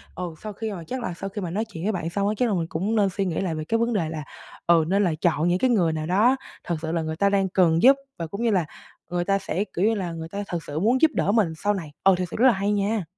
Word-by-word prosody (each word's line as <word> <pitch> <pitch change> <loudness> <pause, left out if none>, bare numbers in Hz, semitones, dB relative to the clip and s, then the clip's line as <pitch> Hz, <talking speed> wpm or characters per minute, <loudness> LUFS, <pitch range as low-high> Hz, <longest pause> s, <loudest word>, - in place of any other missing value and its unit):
Ừ, 175 -3 -5
sau 215 -1 -6
khi 220 +2 -4
mà 180 -4 -6
chắc 260 0 -4
là 205 - -3
sau 195 +3 -6
khi 205 +1 -5
mà 180 - -3
nói 210 +6 -1
chuyện 175 -7 -9
với 210 - +1
bạn 170 -4 -3
xong 200 +3 -1
á, 210 - +1
chắc 245 -2 +2
là 205 - +1
mình 165 -2 -1
cũng 195 +8 -2
nên 205 -3 +3
suy 195 +1 -2
nghĩ 170 -4 -1
lại 175 -4 -2
về 155 - -3
cái 225 - +1
vấn 235 +1 0
đề 170 -7 0
là, 155 -2 -5 0.4
ừ, 170 -1 +5
nên 200 +3 +2
là 175 -4 +1
chọn 165 -1 +2
những 180 +1 +2
cái 260 - +2
người 180 -9 +2
nào 155 0 -3
đó 210 +10 +4 0.3
thật 170 - -2
sự 160 0 -3
là 165 0 0
người 160 0 -3
ta 200 +4 +2
đang 195 -1 +1
cần 170 -3 +3
giúp, 270 +3 +8 0.2
và 165 - -3
cũng 200 +7 -6
như 235 - +3
là 185 -5 +2 0.4
người 175 0 -1
ta 195 +1 +2
sẽ, 190 0 -2
kiểu 185 +4 +2
như 225 - +3
là, 185 -5 -3
người 160 -1 -6
ta 200 +3 -4
thật 170 -3 -4
sự 145 +1 -3
muốn 235 +8 +2
giúp 320 -1 +5
đỡ - - +1
mình 205 -7 +2
sau 205 0 +3
này. 165 -7 -5
Ờ, 195 -1 +6
thực 180 - -1
sự - - -5
rất 255 +3 +5
là 245 - +6
hay 200 +1 -1
nha! 205 0 0
190 Hz, 330 wpm, -24 LUFS, 170-210 Hz, 0.4 s, giúp